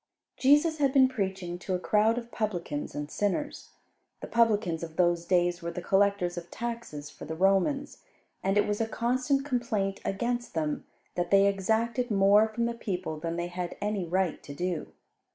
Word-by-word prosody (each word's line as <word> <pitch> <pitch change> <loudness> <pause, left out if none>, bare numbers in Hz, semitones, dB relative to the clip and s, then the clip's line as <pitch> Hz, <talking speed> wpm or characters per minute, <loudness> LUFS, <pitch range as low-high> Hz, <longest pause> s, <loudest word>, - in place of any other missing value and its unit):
Jesus 295 +4 +4
had 275 -2 +2
been 265 -2 +7
preaching 190 -7 -3
to 185 0 -2
a - - -2
crowd 215 +4 +2
of 235 -1 -6
publicans 175 -9 -3
and 145 0 -4
sinners. 210 +9 -2 0.5
The - - -4
publicans 210 -8 +2
of 165 -1 -7
those 175 -1 +2
days 175 -1 +2
were 170 - -3
the 175 +1 -6
collectors 195 -3 +2
of 170 0 -14
taxes 230 -12 -5
for - - -10
the 160 - -5
Romans, 195 - +1 0.4
and 195 +1 +1
it 205 - +4
was 210 +1 -1
a 225 - +1
constant 255 +4 0
complaint 225 -7 -1
against 240 +3 -2
them 155 -2 -1 0.3
that 175 -1 -2
they 195 0 +6
exacted 225 +5 +1
more 205 +1 +5
from 230 +2 -2
the 235 - -1
people 185 -8 -4
than 165 +1 -3
they 170 0 -2
had 175 0 -5
any 205 -2 -1
right 180 0 0
to 140 - -9
do. 175 -1 -3
195 Hz, 180 wpm, -29 LUFS, 175-235 Hz, 0.5 s, been